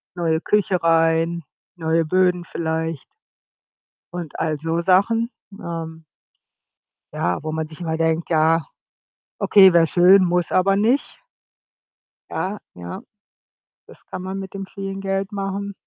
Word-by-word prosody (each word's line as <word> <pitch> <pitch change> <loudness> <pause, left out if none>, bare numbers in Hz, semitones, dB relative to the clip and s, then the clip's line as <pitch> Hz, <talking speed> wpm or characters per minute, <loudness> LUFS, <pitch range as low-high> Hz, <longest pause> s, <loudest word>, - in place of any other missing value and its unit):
Neue 165 -2 0
Küche 195 -2 +1
rein, 165 +1 +2 0.3
neue 165 -1 0
Böden 180 +1 +2
vielleicht 160 -2 -3 1.1
und 170 -4 -6
all 155 -2 -1
so 165 +2 -2
Sachen. 200 +6 +2 0.3
Ähm 165 -1 -7 1.1
Ja, 90 +9 -1
wo 155 - -4
man 160 0 -2
sich 155 - -12
immer 160 -1 -2
denkt: 165 +1 0
„Ja, 160 -1 +3 0.7
okay, 190 -3 +6
wäre 165 -1 +5
schön, 185 +3 +6
muss 175 -1 0
aber 195 +1 +3
nicht.“ 230 +7 0 1.1
Ja. 195 +3 -3 0.2
Ja. 90 0 -8 0.9
Das - - -17
kann 185 - -7
man 190 +1 -5
mit 190 -1 -8
dem 195 -1 -5
vielen 195 0 -6
Geld 195 +1 -2
machen. 200 0 -4
170 Hz, 130 wpm, -21 LUFS, 160-195 Hz, 1.1 s, okay